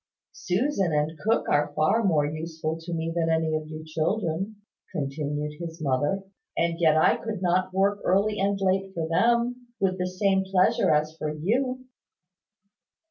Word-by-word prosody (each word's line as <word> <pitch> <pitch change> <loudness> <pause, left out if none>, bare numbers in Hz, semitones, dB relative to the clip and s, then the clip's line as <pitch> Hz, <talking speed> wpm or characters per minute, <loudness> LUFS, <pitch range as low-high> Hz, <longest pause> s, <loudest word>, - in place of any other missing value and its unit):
"Susan 195 - 0
and 150 +2 0
cook 220 +7 +1
are 145 0 +1
far 155 +10 +3
more 160 -7 +3
useful 160 +1 -3
to 165 +2 -8
me 165 0 -2
than 165 -1 +1
any 160 -1 +1
of 155 0 -2
you 155 0 -7
children," 165 +4 -1 0.4
continued 150 -1 -3
his 165 -1 -6
mother, 145 +6 0 0.3
"and 170 0 0
yet 160 -2 +4
I 155 - +4
could 220 -3 -5
not 185 +1 +1
work 200 +2 +2
early 205 +3 +2
and 200 0 +1
late 195 0 0
for 165 -1 -2
them, 240 +7 +1
with 185 -1 0
the 180 - 0
same 190 +1 +1
pleasure 190 -1 +2
as 155 +1 +2
for 155 -2 -3
you." 255 - -1
170 Hz, 160 wpm, -26 LUFS, 155-195 Hz, 0.4 s, yet